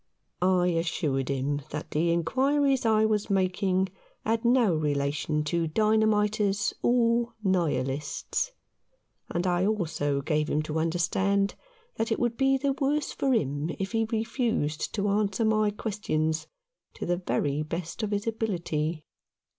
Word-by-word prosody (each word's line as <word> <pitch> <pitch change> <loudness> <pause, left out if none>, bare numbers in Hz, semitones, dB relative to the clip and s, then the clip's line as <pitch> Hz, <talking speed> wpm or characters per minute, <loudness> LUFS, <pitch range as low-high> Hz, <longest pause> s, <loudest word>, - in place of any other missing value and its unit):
I 180 -1 +3
assured 165 -6 -1
him 140 +1 -1
that 150 0 -6
the 170 +3 +2
inquiries 265 - +2
I 220 -1 +4
was 215 -1 0
making 190 0 +1 0.4
had 225 +1 +1
no 235 -5 +4
relation 150 0 0
to 165 +2 0
dynamiters 210 +1 +2
or 235 -1 +2
Nihilists; 150 - -1 0.8
and 175 +1 -1
I 180 +1 +2
also 155 -9 0
gave 150 0 0
him 155 - +1
to 155 +1 -2
understand 190 +4 +1 0.4
that 225 +1 -1
it - - +1
would 240 -1 0
be 270 +1 +3
the 275 0 0
worse 290 +2 0
for 270 - 0
him 145 - 0
if 195 0 -3
he 225 -1 +1
refused 225 - -1
to 205 -1 0
answer 205 +1 +1
my 215 -1 +3
questions 160 -7 -2 0.5
to - - -5
the 175 0 +1
very 150 -5 -1
best 165 +5 -4
of 215 - -1
his 205 0 -1
ability. 170 -8 -2
190 Hz, 140 wpm, -27 LUFS, 155-220 Hz, 0.8 s, I